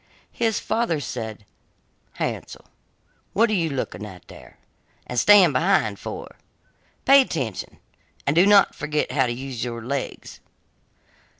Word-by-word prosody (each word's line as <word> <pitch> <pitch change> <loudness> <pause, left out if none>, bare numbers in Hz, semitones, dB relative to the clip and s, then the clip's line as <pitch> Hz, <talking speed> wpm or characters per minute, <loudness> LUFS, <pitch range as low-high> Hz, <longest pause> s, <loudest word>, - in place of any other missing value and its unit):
His 225 -2 0
father 225 -9 -1
said: 110 -6 -6 0.7
'Hansel, - - -5 0.7
what 225 +2 +3
are - - +1
you 170 -5 +1
looking 130 -6 -4
at 95 -4 -11
there - - -14 0.5
and 125 - -1
staying 195 - +6
behind 140 - +1
for? - - -8 0.7
Pay 275 +1 +8
attention, 135 - -4 0.5
and 140 - +1
do 180 +4 +5
not 205 -2 +6
forget 150 0 -2
how 130 -3 +2
to - - -2
use 125 -1 -5
your 115 -2 -5
legs. 140 +1 -5
140 Hz, 130 wpm, -23 LUFS, 120-195 Hz, 0.7 s, Pay